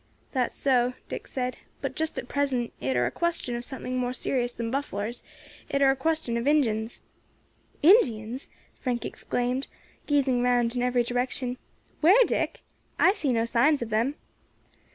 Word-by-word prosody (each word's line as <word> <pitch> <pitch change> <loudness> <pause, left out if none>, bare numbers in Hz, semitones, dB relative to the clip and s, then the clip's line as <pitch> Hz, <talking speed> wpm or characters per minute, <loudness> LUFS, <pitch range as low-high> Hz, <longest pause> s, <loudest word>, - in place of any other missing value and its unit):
"That's 255 -3 0
so," 250 -2 +2 0.2
Dick - - -5
said, 250 -1 -3 0.2
"but - - -4
just 320 0 -2
at - - -4
present 265 -4 -1
it 130 +1 0
air 120 0 +3
a 120 - -1
question 335 - -1
of 240 - -4
something 255 -1 -4
more 250 0 -1
serious 250 -1 -1
than 230 -1 -4
bufflars, 240 -4 -3 0.5
it 275 - +1
air 275 -1 +6
a - - 0
question 290 -4 -1
of 235 +3 -2
Injins." 230 -7 +1 0.8
"Indians!" 255 - +4 0.3
Frank 245 -2 -2
exclaimed, 250 +2 -2 0.4
gazing 270 -4 +2
round 245 -1 +2
in 245 - 0
every 250 -1 +2
direction. 245 +1 -2 0.4
"Where, 395 +10 +6
Dick? - - -1 0.4
I 380 - +5
see 300 -10 0
no 230 -1 +2
signs 250 +4 +3
of 225 - -8
them." 235 +7 +1
250 Hz, 160 wpm, -27 LUFS, 235-280 Hz, 0.8 s, air